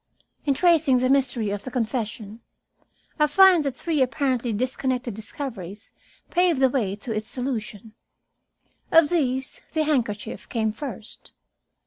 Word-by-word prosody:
In 280 Hz, -, +3 dB
tracing 320 Hz, -5 st, +4 dB
the 255 Hz, +1 st, +2 dB
mystery 245 Hz, -6 st, +1 dB
of 205 Hz, 0 st, -4 dB
the -, -, -6 dB
confession, 225 Hz, -3 st, -3 dB, 0.8 s
I 300 Hz, -, +5 dB
find 365 Hz, +1 st, +6 dB
that 275 Hz, -3 st, -2 dB
three 315 Hz, 0 st, -1 dB
apparently 260 Hz, -2 st, 0 dB
disconnected 255 Hz, +1 st, -2 dB
discoveries 215 Hz, -3 st, -7 dB, 0.4 s
paved 350 Hz, -4 st, +2 dB
the 265 Hz, -1 st, +4 dB
way 210 Hz, -8 st, -1 dB
to 225 Hz, +3 st, -5 dB
its 215 Hz, 0 st, -3 dB
solution. 225 Hz, -4 st, -5 dB, 1.0 s
Of 325 Hz, -2 st, +6 dB
these 265 Hz, -5 st, -1 dB
the 315 Hz, -1 st, +1 dB
handkerchief 230 Hz, -8 st, -2 dB
came 220 Hz, -2 st, 0 dB
first. 230 Hz, -3 st, -9 dB
255 Hz, 130 wpm, -24 LUFS, 220-285 Hz, 1.0 s, find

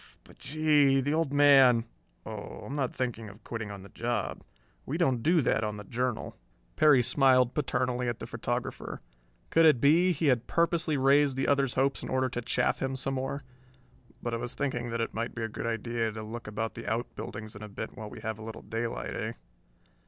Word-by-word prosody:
But, -, -, -18 dB
gee, 145 Hz, -2 st, +3 dB
the 145 Hz, +3 st, 0 dB
Old 160 Hz, -3 st, +1 dB
Man...." 135 Hz, -5 st, +6 dB, 0.4 s
"Oh, -, -, -7 dB
I'm 140 Hz, -, -5 dB
not 135 Hz, -4 st, -1 dB
thinking 115 Hz, -4 st, -3 dB
of 100 Hz, +3 st, -15 dB
quitting 115 Hz, -3 st, -5 dB
on 100 Hz, -2 st, -8 dB
the 100 Hz, -, -12 dB
job. 120 Hz, +1 st, -3 dB, 0.4 s
We 150 Hz, -, -3 dB
don't 135 Hz, -9 st, +2 dB
do 165 Hz, +6 st, +4 dB
that 115 Hz, -, +1 dB
on 105 Hz, -1 st, -2 dB
the 105 Hz, -, -7 dB
Journal." 120 Hz, +2 st, -3 dB, 0.4 s
Perry 150 Hz, -5 st, +6 dB
smiled 130 Hz, -1 st, +4 dB
paternally 125 Hz, -3 st, -1 dB
at 120 Hz, -, -3 dB
the -, -, -7 dB
photographer. -, -, -4 dB, 0.5 s
Could 165 Hz, 0 st, +6 dB
it 150 Hz, -6 st, +5 dB
be 165 Hz, +7 st, +5 dB
he 165 Hz, -1 st, -1 dB
had 125 Hz, -4 st, +2 dB
purposely 170 Hz, -2 st, +1 dB
raised 135 Hz, 0 st, +4 dB
the 135 Hz, -, 0 dB
other's 140 Hz, -3 st, +2 dB
hopes 135 Hz, +1 st, +1 dB
in -, -, -6 dB
order 130 Hz, 0 st, +1 dB
to 120 Hz, -, -3 dB
chaff 120 Hz, -, 0 dB
him 135 Hz, 0 st, -1 dB
some 135 Hz, +1 st, -2 dB
more? 135 Hz, +1 st, -3 dB, 0.8 s
"But 120 Hz, -, -2 dB
I -, -, 0 dB
was 120 Hz, +1 st, -4 dB
thinking 120 Hz, -4 st, -2 dB
that 115 Hz, 0 st, -2 dB
it 115 Hz, -, -2 dB
might 115 Hz, +1 st, -3 dB
be 115 Hz, -, -3 dB
a -, -, 0 dB
good 115 Hz, +1 st, -5 dB
idea 115 Hz, 0 st, -1 dB
to 110 Hz, 0 st, -6 dB
look 115 Hz, +1 st, -7 dB
about 110 Hz, +2 st, -3 dB
the -, -, -8 dB
outbuildings 110 Hz, -2 st, -5 dB
a 105 Hz, +1 st, -8 dB
bit 105 Hz, +2 st, -7 dB
while 110 Hz, -4 st, -7 dB
we -, -, -10 dB
have 110 Hz, 0 st, -4 dB
a -, -, -8 dB
little 110 Hz, 0 st, -8 dB
daylight. 115 Hz, -, -3 dB
Eh?" -, -, -3 dB
125 Hz, 205 wpm, -29 LUFS, 115-140 Hz, 0.8 s, Man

